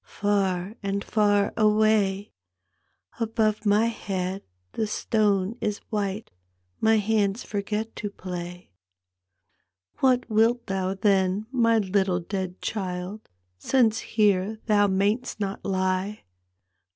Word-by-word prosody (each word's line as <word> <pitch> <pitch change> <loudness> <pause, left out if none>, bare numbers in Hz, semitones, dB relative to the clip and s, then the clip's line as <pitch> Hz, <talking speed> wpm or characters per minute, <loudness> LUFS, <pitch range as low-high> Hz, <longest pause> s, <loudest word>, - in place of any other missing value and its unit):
Far 195 -2 0
and 200 0 -2
far 205 -2 +2
away/ 210 -2 +2 0.9
Above 220 -2 0
my 210 +2 +4
head 195 -4 -3 0.3
the 220 - -2
stone 210 -1 +1
is 210 -1 -1
white. 205 0 -2 0.5
My 220 0 +4
hands 210 0 +1
forget 210 +2 -3
to 205 - -3
play. 180 - -7 0.6
" 90 0 -44
What 255 -2 +3
wilt 230 +2 +2
thou 190 0 -2
then, 195 0 +2
my 230 -3 +3
little 190 -3 +1
dead 185 0 -5
child, 190 0 -4 0.3
Since 225 - +2 0.2
here 205 0 +3
thou 205 -2 +4
may'st 205 +6 0
not 200 -1 -3
lie? 190 +2 -1
205 Hz, 110 wpm, -25 LUFS, 190-215 Hz, 0.9 s, my